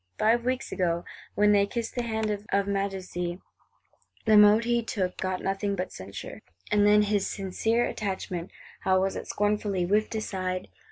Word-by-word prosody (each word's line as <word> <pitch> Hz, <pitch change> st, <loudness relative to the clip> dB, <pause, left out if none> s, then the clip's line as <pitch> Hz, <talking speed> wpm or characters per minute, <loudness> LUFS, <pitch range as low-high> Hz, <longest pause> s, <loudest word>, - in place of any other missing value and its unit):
Five 230 Hz, +2 st, +3 dB
weeks 255 Hz, +1 st, -1 dB
ago, 170 Hz, -2 st, 0 dB, 0.3 s
when 210 Hz, 0 st, +4 dB
they 200 Hz, -1 st, +4 dB
kissed 230 Hz, +1 st, -4 dB
the 245 Hz, -, -1 dB
hand 220 Hz, -2 st, -1 dB, 0.2 s
of 200 Hz, 0 st, +2 dB
Majesty, 190 Hz, -3 st, -3 dB, 0.9 s
the 220 Hz, -1 st, +5 dB
mode 210 Hz, +2 st, +7 dB
he 235 Hz, 0 st, +2 dB
took 195 Hz, -6 st, -2 dB
got 185 Hz, -1 st, -2 dB
nothing 195 Hz, +1 st, -1 dB
but 180 Hz, -1 st, -3 dB
censure; 95 Hz, +1 st, -8 dB, 0.3 s
and 205 Hz, 0 st, +4 dB
then 210 Hz, 0 st, +6 dB
his 205 Hz, -1 st, +1 dB
"sincere 220 Hz, +4 st, 0 dB
attachment," 190 Hz, -4 st, -4 dB, 0.3 s
how 185 Hz, 0 st, +2 dB
was 195 Hz, +1 st, 0 dB
it -, -, -6 dB
scornfully 205 Hz, -2 st, 0 dB
whiffed 210 Hz, +4 st, +1 dB
aside! 185 Hz, -4 st, -3 dB
200 Hz, 160 wpm, -27 LUFS, 185-215 Hz, 0.9 s, mode